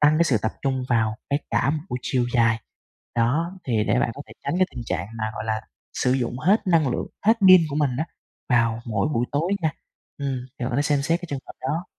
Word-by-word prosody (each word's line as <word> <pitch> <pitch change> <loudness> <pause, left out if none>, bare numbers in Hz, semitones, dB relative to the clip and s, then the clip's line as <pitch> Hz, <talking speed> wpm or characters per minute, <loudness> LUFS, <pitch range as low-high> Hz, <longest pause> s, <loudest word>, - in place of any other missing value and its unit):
tăng 150 +1 +5
cái 170 - +5
sự 130 -8 +3
tập 110 - 0
trung 130 -2 0
vào 110 -3 +2 0.2
cái 140 - +2
cả 135 - +2
một 155 - 0
buổi 125 - -2
chiều 125 -2 +1
dài. 115 -1 +3 0.5
Đó, 140 +9 +1
thì 110 -4 +1
để 120 +4 +2
bạn 115 - +1
có 140 - -7
thể - - -13
tránh 140 - -1
cái 185 - +4
tình 120 - -6
trạng 90 0 -2
mà, 110 - -1
gọi 110 - -4
là, 110 0 -1 0.3
sử 125 - +1
dụng 125 -1 -1
hết 195 - +2
năng 165 -6 +4
lượng, 125 - -2 0.2
hết 225 - +8 0.2
pin 185 -1 +10
của 140 - -2
mình 145 -3 +2
á - - +1 0.4
vào 115 -2 +2
mỗi 110 +2 0
buổi 120 +1 +1
tối 165 +6 +1
nha. 160 - +2 0.5
Ừm, 135 -3 -3
thì 125 - -2
bạn 125 - -1
có 120 - -1
thể 145 - +3
xem 145 -1 +1
xét 165 +4 +1
cái 175 - -7
trường 140 - -3
hợp - - -9
đó. 160 +7 -2
130 Hz, 255 wpm, -24 LUFS, 115-155 Hz, 0.5 s, pin